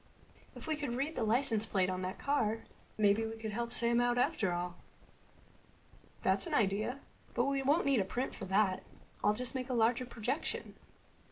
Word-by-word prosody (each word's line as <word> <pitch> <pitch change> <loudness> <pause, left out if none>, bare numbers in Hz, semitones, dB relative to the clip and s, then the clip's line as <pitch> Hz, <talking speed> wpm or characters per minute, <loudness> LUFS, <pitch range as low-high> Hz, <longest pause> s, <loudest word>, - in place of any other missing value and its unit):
"If - - -9
we 315 -2 0
could 290 -6 -3
read 280 +5 -1
the - - -2
license 225 -1 +3
plate 190 -2 +2
on 185 0 -2
that 185 +1 -3
car 225 -6 0 0.3
maybe 210 +1 +4
we 225 0 -4
could 220 -1 -4
help 235 +2 -2
Sam 235 0 +2
out 245 0 +2
after 210 -5 +2
all." 175 0 -3 1.5
"That's - - +2
an 315 - -1
idea. 215 +5 +1 0.3
But 240 - +3
we 275 0 +1
won't 290 +6 +3
need 275 -4 +4
a - - +3
print 245 +7 -2
for - - -6
that. 190 0 +2 0.4
I'll 210 0 +4
just 250 +3 -4
make 260 -1 -3
a 255 - 0
larger 235 +2 +2
projection." 245 +6 -3
235 Hz, 185 wpm, -34 LUFS, 210-260 Hz, 1.5 s, maybe